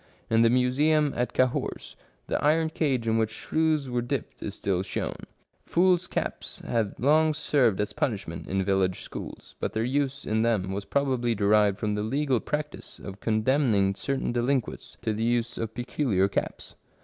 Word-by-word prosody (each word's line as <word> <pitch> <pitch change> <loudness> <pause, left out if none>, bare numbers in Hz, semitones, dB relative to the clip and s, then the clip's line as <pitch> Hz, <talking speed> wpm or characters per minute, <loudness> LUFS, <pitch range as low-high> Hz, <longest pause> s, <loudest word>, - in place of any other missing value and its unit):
In 115 0 +5
the 115 - +5
museum 140 +5 +3
at 125 0 -1
Cahors 130 -1 -1 0.3
the - - -2
iron 160 +2 +3
cage 135 -8 0
in 110 0 +2
which 110 -1 +1
shrews 155 +5 0
were 125 -1 -1
dipped 130 +1 -4
is 100 - -5
still 95 -2 -1
shown. 95 - -3 0.5
Fools' 180 0 +2
caps - - -4
have 110 -4 -1
long 155 +4 +3
served 135 -9 +2
as 105 0 -1
punishment 100 -8 -3
in 95 0 0
village 95 -2 +1
schools, - - -9
but - - -2
their 110 - 0
use 140 +2 -1
in 110 0 +1
them 110 -5 +1
was 100 +1 -4
prob 140 0 0
ably 120 -2 0
derived 105 -1 +3
from 105 -1 -1
the 105 - -1
legal 130 +3 +1
practice 150 +3 -5
of 100 0 -9
condemning 110 -3 +2
certain 135 +6 -2
delinquents 120 0 -2
to 110 -2 0
the 110 +1 -2
use 120 0 0
of 110 0 -4
peculiar 120 -5 +1
caps. 100 - -4
120 Hz, 175 wpm, -27 LUFS, 105-140 Hz, 0.5 s, In